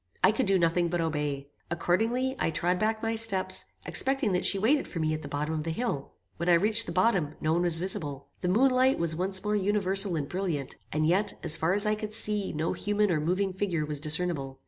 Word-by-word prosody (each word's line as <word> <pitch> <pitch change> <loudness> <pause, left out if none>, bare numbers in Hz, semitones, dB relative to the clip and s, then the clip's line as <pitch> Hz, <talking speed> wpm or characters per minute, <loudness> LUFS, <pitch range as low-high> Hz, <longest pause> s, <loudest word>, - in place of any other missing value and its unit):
I - - +6
could 225 +1 -1
do 195 0 +4
nothing 170 0 +1
but 175 +1 -2
obey. 145 -3 -3 0.2
Accordingly, 225 +10 0
I - - +1
trod 175 +3 0
back 220 +1 -1
my 225 0 0
steps, 220 -4 0 0.2
expecting 265 -5 +1
that 180 0 0
she 200 - +3
waited 250 +9 +2
for - - -8
me 155 -1 0
at 155 - -4
the 145 - -8
bottom 145 +2 -3
of 155 -1 -3
the 165 - -4
hill. 160 - -3 0.2
When 170 +2 -2
I - - +6
reached 215 +6 +4
the - - -4
bottom, 180 -5 +1
no 155 +1 0
one 170 - +1
was 175 -2 +2
visible. 145 -6 -4
The 180 - -2
moon 250 +8 +3
light 255 +1 +3
was 165 -1 -1
once 190 +2 -1
more 210 0 0
universal 195 -2 +2
and 145 -3 -3
brilliant, 170 -7 -3 0.2
and 155 +1 0
yet, 190 +6 +1
as 155 - +3
far 165 +3 0
as 205 +2 +4
I 210 - +2
could 215 0 -4
see 210 -2 +2
no 155 +1 -2
human 205 -1 0
or 160 - +1
moving 185 +5 -1
figure 180 -5 -2
was 150 -1 -2
discernible. 150 -3 -1
180 Hz, 235 wpm, -28 LUFS, 160-210 Hz, 0.2 s, I